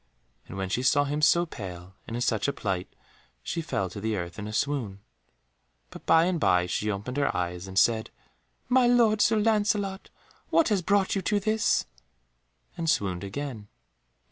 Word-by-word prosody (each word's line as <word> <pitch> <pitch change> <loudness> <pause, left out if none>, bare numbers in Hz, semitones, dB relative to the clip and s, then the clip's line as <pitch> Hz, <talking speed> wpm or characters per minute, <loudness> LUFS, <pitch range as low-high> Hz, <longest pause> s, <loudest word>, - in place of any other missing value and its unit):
And 95 - -8
when 95 -1 -3
she 120 - -1
saw 140 +3 +3
him 145 +1 -2
so 170 +3 +4
pale, 95 - -9
and 115 - -5
in - - -3
such 110 -1 0
a 140 - 0
plight, 95 -3 -3 0.6
she 170 - -3
fell 95 -11 -2
to 100 - -7
the 110 0 -1
earth 85 +1 -6
in 105 - -5
a - - -6
swoon, 115 -5 -2 0.9
but - - -12
by 165 0 +5
and 180 -2 0
by 90 -9 +3
she 105 +4 -2
opened 105 +6 -4
her 140 - 0
eyes 90 +1 -3
and 95 0 -7
said, 110 +1 +3 0.6
"My 250 0 +4
lord 230 -3 +4
Sir 220 +1 +4
Lancelot, 205 -2 0 0.4
what 330 - +3
has 205 -4 +1
brought 195 +2 +2
you 195 - 0
to 205 +3 +1
this?" 215 +2 +1 0.9
and 165 -2 -2
swooned 95 -9 0
again. 110 0 -6
140 Hz, 180 wpm, -27 LUFS, -, 0.9 s, by